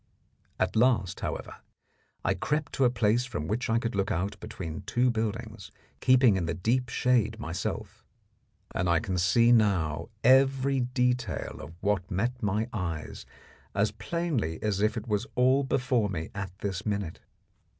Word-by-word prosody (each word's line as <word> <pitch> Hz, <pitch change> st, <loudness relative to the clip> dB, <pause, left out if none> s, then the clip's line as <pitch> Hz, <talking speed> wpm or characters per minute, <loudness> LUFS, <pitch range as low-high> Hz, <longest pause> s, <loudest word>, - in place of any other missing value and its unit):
At -, -, 0 dB
last, 110 Hz, -5 st, +2 dB
however, -, -, -5 dB, 0.7 s
I -, -, +3 dB
crept 150 Hz, -1 st, -2 dB
to 135 Hz, -, +2 dB
a -, -, +5 dB
place 120 Hz, 0 st, +2 dB
from 105 Hz, -12 st, -4 dB
which 110 Hz, +3 st, -1 dB
I 115 Hz, -, +3 dB
could 115 Hz, 0 st, -2 dB
look 100 Hz, -1 st, 0 dB
out 95 Hz, +5 st, -2 dB
between 85 Hz, -7 st, -6 dB
two 125 Hz, +1 st, +2 dB
buildings, 110 Hz, 0 st, -4 dB, 0.3 s
keeping 130 Hz, -5 st, +5 dB
in 85 Hz, -3 st, -1 dB
the 85 Hz, -, -1 dB
deep 120 Hz, +8 st, 0 dB
shade 115 Hz, -2 st, +1 dB
myself, 85 Hz, -3 st, -4 dB, 0.7 s
and 90 Hz, -, 0 dB
I 85 Hz, -1 st, +4 dB
can 90 Hz, +1 st, -2 dB
see 115 Hz, +7 st, +4 dB
now 95 Hz, -10 st, +2 dB, 0.2 s
every 135 Hz, +1 st, +4 dB
detail 125 Hz, -1 st, -1 dB
of 75 Hz, +5 st, -10 dB
what 100 Hz, -2 st, 0 dB
met 120 Hz, +6 st, -1 dB
my 105 Hz, +1 st, 0 dB
eyes 85 Hz, -7 st, -4 dB, 0.5 s
as 100 Hz, +1 st, +2 dB
plainly 115 Hz, -, -2 dB
as 105 Hz, -2 st, 0 dB
if 110 Hz, +2 st, +2 dB
it 110 Hz, -, -5 dB
was 105 Hz, -2 st, -1 dB
all 130 Hz, +3 st, +4 dB
before 125 Hz, -5 st, +1 dB
me 80 Hz, -4 st, -4 dB
at 100 Hz, -1 st, -4 dB
this 95 Hz, -3 st, -3 dB
minute. 100 Hz, -6 st, -3 dB
110 Hz, 160 wpm, -28 LUFS, 95-125 Hz, 0.7 s, a